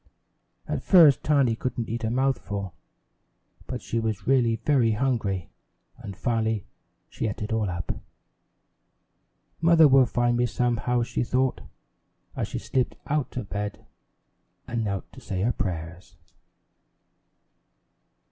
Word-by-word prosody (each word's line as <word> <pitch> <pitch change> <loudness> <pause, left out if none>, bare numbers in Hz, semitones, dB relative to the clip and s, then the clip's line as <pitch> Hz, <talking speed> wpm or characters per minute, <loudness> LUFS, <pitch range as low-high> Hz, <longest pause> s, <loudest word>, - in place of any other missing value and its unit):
At - - -2
first 160 - +6
Tiny 140 -6 +3
couldn't 120 -1 -3
eat 115 +1 -4
a 110 - 0
mouthful, 115 -7 -1 0.9
but - - -5
she 115 - -2
was 110 -4 -2
really 125 -4 +3
very 120 -3 +2
hungry, 105 -7 -1 0.5
and 100 -2 -8
finally 110 -3 0 0.4
she - - -3
ate 105 0 -4
it 105 - -3
all 110 -3 0
up. 85 -1 -3 1.7
"Mother 165 -1 +7
will 135 -2 +6
find 120 0 +1
me 120 0 +2
somehow," 120 +1 0
she 120 - -2
thought, 130 +1 0 0.7
as - - -2
she - - -5
slipped 130 -1 -1
out 145 -3 -2
of 110 -6 -4
bed 105 0 -4 0.8
and 115 -1 -2
knelt 100 -2 -2
to - - -12
say 95 -1 -3
her 120 - +2
prayers. 85 -2 -5
115 Hz, 130 wpm, -26 LUFS, 105-130 Hz, 1.7 s, Mother